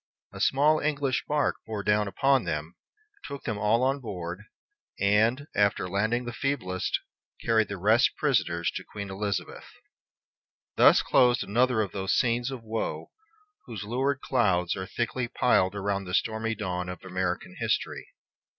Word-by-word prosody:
A - - -8
small 150 +3 +4
English 145 -3 -1
bark 145 -1 +1
bore 110 -2 -4
down 105 0 +2
upon 135 +6 +2
them, 75 +3 -4 0.5
took 140 -1 -7
them 110 -3 -3
all 110 +4 +2
on 135 +2 +1
board, 95 -4 -6 0.5
and, 110 +7 +2
after 100 -2 +2
landing 110 +6 0
the 120 - -5
feeblest, 110 -10 -1 0.5
carried 110 -2 +3
the 100 - -5
rest 110 +6 +3
prisoners 110 - +1
to - - -6
Queen 100 -2 -7
Elizabeth. 100 0 -4 1.1
Thus - - +6
closed 125 0 +4
another 120 +2 +2
of 100 - -6
those 95 -1 -1
scenes 120 0 +1
of 130 -4 -7
woe 110 0 -4 0.6
whose 110 -5 -6
lurid 130 +5 -1
clouds 95 -9 +1
are 95 -1 -5
thickly 120 +1 -2
piled 100 -6 +2
around 100 -1 -2
the 90 - -2
stormy 110 0 0
dawn 90 -3 -3
of 90 - -8
American 90 -1 -3
history. - - -1
110 Hz, 150 wpm, -27 LUFS, 95-125 Hz, 1.1 s, Thus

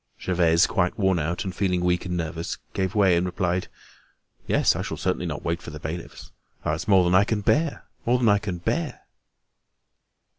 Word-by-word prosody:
Gervaise, 85 -2 +3
quite 90 -4 0
worn 95 -4 +2
out 85 +5 -2
and 95 -2 -4
feeling 90 -2 0
weak 90 0 0
and 90 0 -2
nervous, 80 0 -4 0.2
gave 95 +2 -1
way 95 -4 +5
and 85 - +2
replied: 90 0 -1 0.8
"Yes, - - +3
I - - -2
shall - - -4
certainly - - -1
not - - -5
wait 85 +1 -1
for - - -8
the 75 0 -8
bailiffs. 80 +3 -7 0.3
Ah! 75 - +1
it's 80 - -4
more 95 -3 +6
than 90 0 +1
I 95 +2 +6
can 110 0 -1
bear—more 145 -3 0
than 120 -2 +1
I 100 0 +4
can 95 -3 -4
bear." 85 - -2
90 Hz, 190 wpm, -25 LUFS, 85-100 Hz, 0.8 s, more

